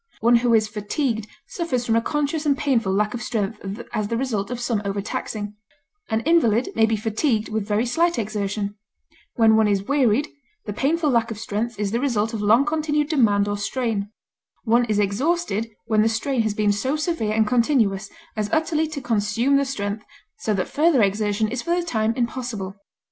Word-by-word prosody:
One 235 +1 +5
who 240 0 +1
is 215 -1 +3
fatigued 220 +2 -2 0.2
suffers 265 -9 -2
from 225 - +2
a 230 - +3
conscious 295 +3 -1
and 285 -3 +2
painful 235 -9 +1
lack 210 +2 +1
of 240 - -4
strength 210 -2 -3
as 215 -3 -1
the 230 - -1
result 230 -6 -2
of 245 -1 -4
some 235 -3 -1
overtaxing; 205 +1 -4 0.6
an 220 -1 0
invalid 250 -7 +3
may 225 0 +3
be 225 - +1
fatigued 220 +2 0
with 215 -2 -2
very 210 +3 +1
slight 335 +8 +1
exertion; 205 -1 -2 0.6
when 225 -2 +5
one 220 -1 +4
is 200 -2 +1
wearied, 275 +1 +2 0.4
the 205 - -4
painful 300 +6 +1
lack 235 -1 +2
of 225 - -5
strength 220 +2 -3
is 205 -2 -1
the 230 - 0
result 230 -4 0
of 220 - -3
long 225 +6 +4
continued 300 -1 0
demand 205 -9 +3
or 205 0 -2
strain; 215 -2 -2 0.5
one 235 +1 +3
is 215 -3 0
exhausted 225 - 0 0.2
when 215 -1 +2
the 220 - +3
strain 235 +3 0
has 215 -2 -1
been 210 -1 +2
so 260 +8 0
severe 305 -9 -1
and 220 0 +3
continuous 225 -4 +1 0.3
as 210 -1 -2
utterly 320 0 +1
to 305 -2 -6
consume 230 +3 +1
the 280 - +1
strength, 210 -5 -3 0.4
so 220 - -1
that 195 -3 0
further 300 -6 +3
exertion 205 +2 +1
is 240 +3 -3
for 340 0 0
the 345 - -3
time 225 -7 0
impossible. 235 -6 -3
225 Hz, 190 wpm, -23 LUFS, 210-265 Hz, 0.6 s, One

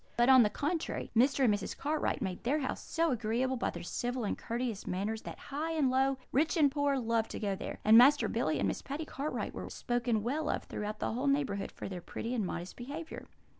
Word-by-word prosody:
But, 240 +2 +4
on 260 -1 +9
the 210 - +4
contrary, 305 +9 -2
Mr. 265 +4 +4
and 225 -5 +5
Mrs. 205 -1 -3
Cartwright 305 +2 -1
made 185 -1 -4
their 270 +5 +2
house 270 -4 -3
so 330 -1 0
agreeable 240 +3 0
by 240 - -1
their 170 - -7
civil 245 +7 -2
and 205 - -1
courteous 235 -3 -4
manners 210 +4 -2
that - - -8
high 310 +4 -4
and 290 -5 +2
low, 265 +1 +2
rich 315 +6 +2
and 290 -3 +5
poor, 285 -1 +1
loved 230 -2 0
to - - -5
go 200 -3 -1
there; - - -6
and 220 +2 +9
Master 280 +4 +6
Billy - - 0
and - - +1
Miss - - -2
Patty 290 +3 -5
Cartwright 295 0 -4
were - - -6
spoken 240 -3 -1
well 295 +6 -1
of - - -1
throughout 210 0 -4
the - - -2
whole 255 +5 -1
neighbourhood 275 -8 0
for - - -7
their 185 -2 -6
pretty 230 +7 -5
and 220 -6 0
modest 175 +1 -5
behaviour. 295 +7 -7
250 Hz, 225 wpm, -32 LUFS, 220-285 Hz, -, on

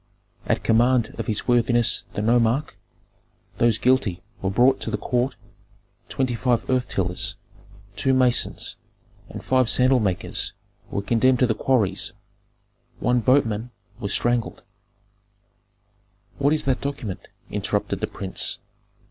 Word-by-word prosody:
At - - 0
command 120 0 +3
of 115 - -3
his 105 - -1
worthiness 120 -1 +3
the 105 - -1
nomarch, 120 +5 +2 0.9
those 115 -2 +3
guilty 115 -7 +1 0.2
were 95 - 0
brought 125 +7 +3
to - - -2
the 110 - -1
court; 125 +2 -1 0.7
twenty 130 -2 -1
five 120 0 0
earth 130 -1 +1
tillers, 90 -2 -2 0.6
two 135 - +1
masons, 130 -2 +1 0.5
and - - -8
five 130 -3 +2
sandal 130 +1 +4
makers 95 -4 -1 0.4
were 100 - -3
condemned 125 +4 +3
to 125 - +3
the 115 - +1
quarries, 110 -2 0 0.9
one 125 +1 +2
boatman 115 -2 +1 0.3
was 100 - -4
strangled 120 +1 0 0.9
" 100 -1 -40
"What 140 +1 +3
is 155 - +1
that 135 -1 0
document?" 140 -9 -5 0.2
interrupted - - -2
the - - -2
prince. 95 -2 -2
120 Hz, 130 wpm, -23 LUFS, 105-130 Hz, 0.9 s, sandal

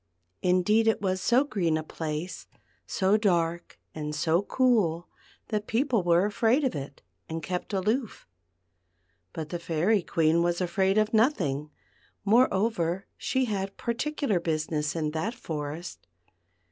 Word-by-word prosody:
Indeed 185 +5 +3
it 225 - +3
was 185 -2 -1
so 245 +4 +4
green 180 - 0
a 155 - -3
place, 155 +2 -5 0.4
so 195 +2 +2
dark 175 -5 0 0.2
and 150 -1 -4
so 160 +4 +2
cool, 205 -8 +1 0.4
that 210 -1 -2
people 240 -1 +1
were 175 +1 +3
afraid 225 +7 +2
of 260 - +1
it, 140 -1 -7 0.3
and 160 0 -4
kept 180 +5 -4
aloof 215 +5 -1 1.1
But 155 -1 -6
the 175 - -4
Fairy 175 +6 +1
Queen 165 0 +2
was 175 0 +1
afraid 190 +2 +1
of 215 +1 +2
nothing; 175 - +1 0.6
moreover 200 -5 +2
she 260 -1 0
had 195 -3 -3
particular 235 - -1
business 155 -2 -1
in 155 -2 -1
that 180 +10 -2
forest. 155 -5 -6
185 Hz, 135 wpm, -27 LUFS, 160-220 Hz, 1.1 s, so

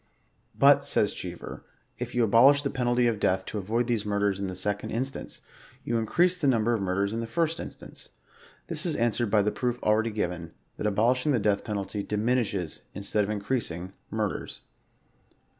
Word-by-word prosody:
But, - - +6
says - - +1
Cheever, - - -7 0.2
" - - -39
if 125 0 -5
you 120 - +3
abolish 130 +6 +6
the 140 - -1
penalty 120 -1 +1
of 115 -3 +1
death 95 -2 +1
to 105 - -4
avoid 115 +5 0
these 115 -3 0
murders 100 -1 0
in 100 - -2
the 95 - -5
second 100 +2 -2
instance, 130 +4 -4 0.4
you 115 -1 0
increase 175 +11 +2
the 145 - +1
number 120 -2 +3
of 110 - 0
murders 100 +2 0
in 115 - -2
the 115 - -3
first 165 +3 0
instance/' - - -9 0.6
This 160 0 -1
is 170 -5 +1
answered 120 -2 +1
by 105 -1 +4
the 105 - +1
proof 125 -1 -1
already 110 +2 +3
given, 90 -6 -3 0.2
that - - -1
abolishing 125 +7 +2
the 120 - +2
death 100 -1 +1
penalty 100 -1 -3
diminishes^ 105 -6 -1
in 100 - -6
stead 105 +1 +1
of - - -6
increasing, 100 -4 -2 0.2
murders. - - -3
110 Hz, 185 wpm, -27 LUFS, 100-125 Hz, 0.6 s, But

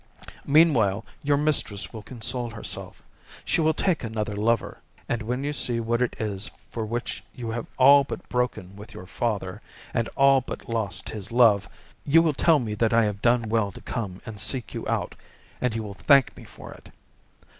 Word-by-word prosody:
Meanwhile, 120 - +4 0.2
your 145 -1 +2
mistress 140 -10 0
will 110 - -7
console 120 +1 -3
herself; 110 -2 -7 0.4
she - - +1
will 160 0 +2
take 180 -5 +1
another 110 -2 -3
lover; 115 +3 0 0.3
and 120 - -1
when 125 +5 -3
you 145 +1 -2
see 120 -4 -1
what 115 +1 0
it 125 - 0
is 105 -2 -2 0.2
for 110 -2 -3
which 120 +2 -3
you 115 -2 -5
have 115 0 -4
all 140 +2 +7
but - - -7
broken 125 -6 -2
with 105 +3 -12
your 90 - -9
father, 100 -2 -3 0.3
and 115 -1 0
all 135 -1 +5
but - - -8
lost 110 -5 -2
his 105 -2 -7
love, 115 -5 +4 0.3
you 165 +3 +5
will 160 -2 +2
tell 165 +3 +4
me 115 -6 -3
that 110 +2 +1
I 115 0 +5
have 105 -1 -3
done 120 -1 +2
well 110 -2 +1
to - - -12
come 100 -6 -5
and 110 -2 -8
seek 130 -4 -1
you - - -5
out, - - -1 0.5
and 125 -3 0
you 110 - -2
will 100 -2 -7
thank 140 +5 +4
me - - -12
for - - -11
it. - - -16
115 Hz, 190 wpm, -25 LUFS, 105-130 Hz, 0.5 s, all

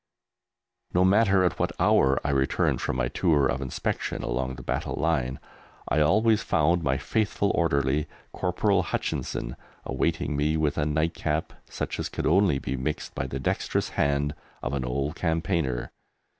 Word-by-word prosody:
No 90 +1 +5
matter 100 -1 +4
at 90 - 0
what - - -1
hour 65 0 +4
I 70 - +1
returned 70 -1 +1
from - - -1
my - - 0
tour 75 0 +2
of 65 0 0
inspection 65 -2 -3
along 65 +2 -2
the 65 - -10
battle - - -2
line, 65 -5 0 0.5
I 75 - +2
always 105 +8 +4
found 85 +3 +2
my 65 -3 +1
faithful 105 - 0
orderly, 70 -3 +1 0.3
Corporal - - +1
Hutchinson, - - -3 0.3
awaiting - - -1
me 75 +2 +1
with 75 0 0
a 75 - +1
"nightcap" 80 0 -1 0.2
such - - -4
as - - -2
could - - -4
only 90 -2 +4
be 65 - -3
mixed 70 +4 -3
by 65 - -3
the 65 +1 -4
dexterous 65 - -1
hand 70 +1 0 0.3
of 60 - -2
an 70 -2 -1
old 70 +4 -1
campaigner. 80 -7 -1
75 Hz, 155 wpm, -26 LUFS, 65-85 Hz, 0.5 s, No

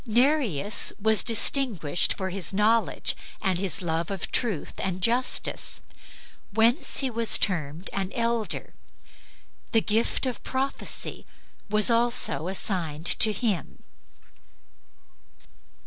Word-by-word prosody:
Nereus 230 - +1
was 220 +1 +4
distinguished 225 - +1
for 190 -1 -5
his 190 -1 -1
knowledge 215 +3 +1 0.2
and 190 -4 -1
his 195 0 0
love 165 0 -3
of 195 -3 -5
truth 220 - -2
and 185 -1 -3
justice, 240 +6 0 0.7
whence 230 - +2
he 265 -2 -2
was 230 -1 +5
termed 165 -2 -2
an 195 -1 -4
elder; 230 -2 -3 1.0
the 225 - +3
gift 220 +5 -1
of 255 -2 -5
prophecy 265 +1 -3 0.4
was 215 +2 +4
also 235 -7 +3
assigned 175 -5 -2
to 220 - +8
him. 210 -4 -4
215 Hz, 105 wpm, -24 LUFS, 185-235 Hz, 1.0 s, to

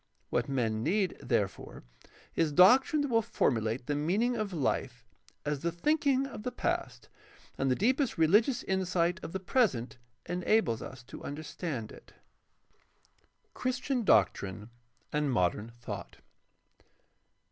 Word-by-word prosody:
What - - 0
men 115 -5 0
need, 185 - +1
therefore, 105 -6 -2 0.5
is 160 -2 +2
doctrine 260 - +6
that 285 - -2
will 230 -2 +3
formulate 120 - 0
the 145 - -1
meaning 195 +12 +1
of 215 -3 -2
Hfe 160 -8 -2 0.4
as 145 -1 -1
the 170 +4 -1
thinking 275 - +1
of 275 - -7
the 250 - -3
past - - -3 0.5
and 135 - 0
the 130 - +3
deepest 255 - +1
rehgious 210 - +3
insight 180 -1 0
of - - -6
the 190 - -3
present 180 - 0 0.3
enable 180 - +1
us 130 -1 -9
to - - -11
understand 145 -4 -5
it. - - -15 1.4
Christian 255 0 -1
doctrine 105 - +2 0.4
and 150 -2 +1
modern 105 +1 0
thought. 125 - -7
170 Hz, 125 wpm, -30 LUFS, -, 1.4 s, doctrine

